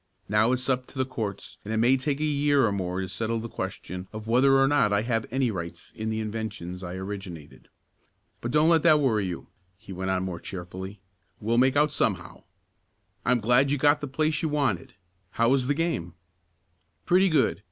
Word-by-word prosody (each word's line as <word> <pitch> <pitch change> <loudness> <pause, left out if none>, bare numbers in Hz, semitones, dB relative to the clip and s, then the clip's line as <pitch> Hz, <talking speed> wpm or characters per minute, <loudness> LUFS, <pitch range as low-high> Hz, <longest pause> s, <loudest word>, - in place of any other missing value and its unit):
Now 105 +3 +3
it's 130 0 -1
up 130 -1 0
to - - -14
the 130 - +1
courts, 110 -6 -5
and 105 - -6
it 110 - 0
may 120 +4 +4
take 140 +2 -2
a - - -1
year 145 -3 +3
or 105 - +1
more 95 -1 -2
to 95 - -3
settle 115 +5 -2
the 115 - -5
question 90 -4 -6
of 110 0 -8
whether 135 +4 +5
or 135 - +5
not 140 -7 +3
I 100 +1 +2
have 115 -2 -1
any 130 -1 0
rights 85 -4 -7
in 110 0 -3
the 110 0 -2
inventions 105 -5 -5
I 90 -1 -6
originated. 95 -5 -8 0.7
But 120 - -3
don't 150 +5 +4
let 165 -2 +5
that 155 -2 +5
worry 110 -8 +1
you," 90 -2 -6 0.3
he 95 - -10
went 95 +1 -3
on 95 0 0
more 90 -2 -4
cheerfully. 95 +2 -8 0.4
"We'll 115 +3 +1
make 130 +1 +4
out 150 +1 +3
somehow. - - -2 0.8
I'm 125 0 +3
glad 125 +5 +4
you 145 - +1
got 145 +2 +3
the 145 - -3
place 155 +3 0
you 160 - 0
wanted. 135 - -1 0.3
How 115 +4 +1
was 130 -1 +2
the 145 - +1
game?" 145 - -2 0.9
"Pretty 185 +2 +4
good. 150 - +2
115 Hz, 205 wpm, -26 LUFS, 95-135 Hz, 0.9 s, whether